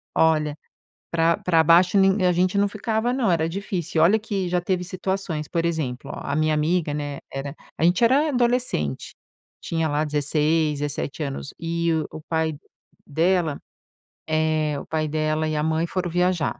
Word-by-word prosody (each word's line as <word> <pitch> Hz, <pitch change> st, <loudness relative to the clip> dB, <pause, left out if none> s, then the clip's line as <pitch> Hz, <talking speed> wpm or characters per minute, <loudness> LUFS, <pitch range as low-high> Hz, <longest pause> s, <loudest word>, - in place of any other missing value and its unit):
Olha, 155 Hz, -2 st, +2 dB, 0.5 s
pra 165 Hz, 0 st, +2 dB
pra 165 Hz, -3 st, +3 dB
baixo 175 Hz, +4 st, +5 dB
nin 195 Hz, 0 st, +4 dB
a 180 Hz, -, +4 dB
gente 185 Hz, +3 st, +1 dB
não 205 Hz, -, +3 dB
ficava 220 Hz, +3 st, -1 dB
não, 245 Hz, -8 st, +1 dB
era 160 Hz, -1 st, +1 dB
difícil. 175 Hz, -3 st, -3 dB
E -, -, +7 dB
olha 210 Hz, +6 st, +5 dB
que 195 Hz, -4 st, -3 dB
já 180 Hz, 0 st, +1 dB
teve 180 Hz, 0 st, -1 dB
situações. 185 Hz, -4 st, -3 dB
Por 165 Hz, +2 st, -1 dB
exemplo, 155 Hz, -7 st, -3 dB
ó, -, -, -6 dB
a 140 Hz, -, -2 dB
minha 155 Hz, 0 st, +2 dB
amiga, 155 Hz, 0 st, +1 dB
né, 145 Hz, -1 st, -4 dB
era 135 Hz, +2 st, -5 dB, 0.2 s
a -, -, -1 dB
gente 180 Hz, +6 st, +3 dB
era 275 Hz, +6 st, +4 dB
adolescente, 240 Hz, -, 0 dB, 0.5 s
tinha 165 Hz, -1 st, -1 dB
lá 150 Hz, +1 st, 0 dB
16, 150 Hz, +1 st, +1 dB
17 145 Hz, +1 st, -3 dB
anos. 140 Hz, 0 st, -5 dB
E 170 Hz, 0 st, -1 dB, 0.2 s
o 155 Hz, -, -8 dB
pai 160 Hz, -2 st, 0 dB, 0.5 s
dela, 165 Hz, 0 st, +1 dB, 0.7 s
eh, 155 Hz, -1 st, +1 dB
o -, -, -9 dB
pai 155 Hz, -1 st, -1 dB
dela 155 Hz, +1 st, 0 dB
e 155 Hz, -, -2 dB
a 150 Hz, -, 0 dB
mãe 160 Hz, +1 st, +1 dB
foram 180 Hz, -1 st, -2 dB
viajar. 180 Hz, -2 st, 0 dB
165 Hz, 175 wpm, -23 LUFS, 155-185 Hz, 0.7 s, E